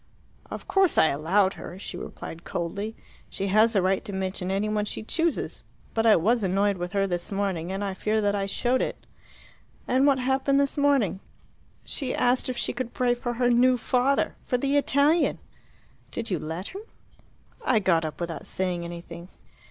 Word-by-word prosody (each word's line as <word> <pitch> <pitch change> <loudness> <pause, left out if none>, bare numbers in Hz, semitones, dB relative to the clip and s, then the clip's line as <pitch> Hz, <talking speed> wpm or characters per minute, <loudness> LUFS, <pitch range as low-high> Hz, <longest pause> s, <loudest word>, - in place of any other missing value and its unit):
"Of - - -7
course 385 -3 +3
I 160 - +6
allowed 185 +7 +2
her," 175 - -9
she 190 - -7
replied 170 -1 -8
coldly. 200 +6 -4 0.3
"She 195 - -4
has 215 +3 +4
a 195 - +3
right 190 +1 +1
to - - -4
mention 190 -1 -3
any 195 +2 0
one 210 0 0
she 210 - -5
chooses. 330 +7 -1 0.3
But 225 0 +2
I 220 - +8
was 225 +8 +2
annoyed 195 +1 +1
with 175 +2 -4
her 195 -1 +2
this 175 -1 -3
morning, 190 -4 -1
and 195 +1 -3
I 195 -1 -2
fear 215 +3 0
that 205 -1 +1
I 200 -1 -1
showed 245 +5 +1
it." - - -4 0.8
"And 260 +3 +3
what 275 -2 +4
happened 265 +2 +2
this 280 -1 +1
morning?" 280 - +2 0.7
"She 265 -4 -3
asked 250 +1 +2
if 250 - -3
she - - -1
could 240 -1 -5
pray 245 -1 +2
for 240 0 -3
her 245 +1 +2
'new 250 +1 +4
father' 255 +3 +1
for 250 - +1
the 275 +3 0
Italian!" 285 +3 +3 0.7
"Did 230 -2 -5
you 180 - 0
let 160 +5 -5
her?" 390 - -7 0.8
"I 250 - +3
got 185 -5 +3
up 155 -1 -5
without 170 -2 -4
saying 180 -2 -2
anything." 170 0 -8
210 Hz, 185 wpm, -26 LUFS, 185-250 Hz, 0.8 s, I